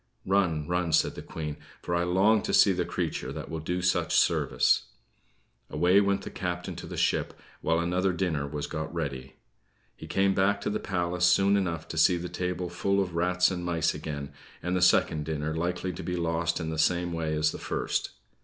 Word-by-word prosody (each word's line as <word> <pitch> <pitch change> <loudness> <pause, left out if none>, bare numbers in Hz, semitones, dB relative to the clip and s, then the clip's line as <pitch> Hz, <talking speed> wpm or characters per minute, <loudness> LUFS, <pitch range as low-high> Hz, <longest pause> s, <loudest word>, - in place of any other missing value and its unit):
"Run, 90 -6 +1
run!" 90 -2 0
said - - +3
the - - -8
Queen, 75 -2 -6 0.3
"for 85 - -3
I 85 0 +2
long 95 +5 +3
to - - 0
see 100 - +6
the 90 -1 -1
creature 85 -7 -3
that 75 +1 -7
will 80 - -3
do 90 +3 -3
such 90 - +1
service." - - +3 0.8
Away 90 +3 +4
went 100 -1 0
the - - -7
captain 90 -1 -4
to - - -7
the - - -7
ship - - 0 0.2
while 80 - +1
another 90 +3 +1
dinner 85 -6 -1
was 75 0 -4
got 80 -1 -5
ready. 70 -6 -5 0.6
He - - -10
came 95 0 +2
back 100 +2 +2
to - - -2
the 105 - -1
palace 90 -1 -1
soon 95 +3 +4
enough 85 -5 -1
to 80 - -2
see 90 +3 +5
the 85 +1 -5
table 90 0 -3
full 100 +3 0
of 95 -3 -1
rats 90 +2 +2
and 90 -1 -4
mice 85 -2 0
again, 70 -2 -6 0.3
and 90 +1 -1
the 90 - 0
second 80 -3 +3
dinner 80 0 -2
likely 90 +2 -2
to - - -7
be 90 - -3
lost 85 -1 -1
in 80 -1 -3
the 80 - -3
same 85 +2 +1
way 80 -2 -1
as 75 0 +2
the - - -7
first. - - -2
85 Hz, 205 wpm, -28 LUFS, 80-90 Hz, 0.8 s, see